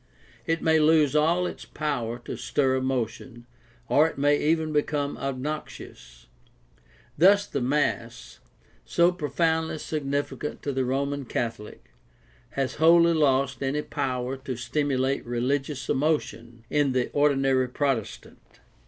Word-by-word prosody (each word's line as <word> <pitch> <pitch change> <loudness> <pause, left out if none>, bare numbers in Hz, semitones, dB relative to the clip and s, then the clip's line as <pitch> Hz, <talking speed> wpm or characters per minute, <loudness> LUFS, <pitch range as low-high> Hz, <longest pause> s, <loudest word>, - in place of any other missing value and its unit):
It 165 0 0
may 160 0 +4
lose 155 -2 +4
all 165 +4 +3
its - - -6
power 125 -7 -3
to - - -5
stir 130 +2 0
emotion, 125 -2 -3 0.4
or 150 +3 +4
it - - -8
may 145 +1 +3
even 155 +1 0
become 145 -1 0
obnoxious. 130 - -6 0.9
Thus 200 +4 +6
the 140 - -3
mass, 125 -3 -2 0.4
so 170 - +3
profoundly 160 0 -1
significant 145 -1 -3
to 145 - -2
the 130 -1 -1
Roman 140 +2 -2
Catholic, 115 - -5 0.7
has 135 -1 -1
wholly 170 +1 +6
lost 135 -4 +1
any 140 +2 -1
power 130 0 -3
to 130 -1 -6
stimulate 135 +1 -1
religious 135 +3 -2
emotion 120 -6 -2
in 145 -3 +2
the 125 -1 0
ordinary 135 -3 +2
Protestant. 130 -5 -3
140 Hz, 120 wpm, -26 LUFS, 130-150 Hz, 0.9 s, Thus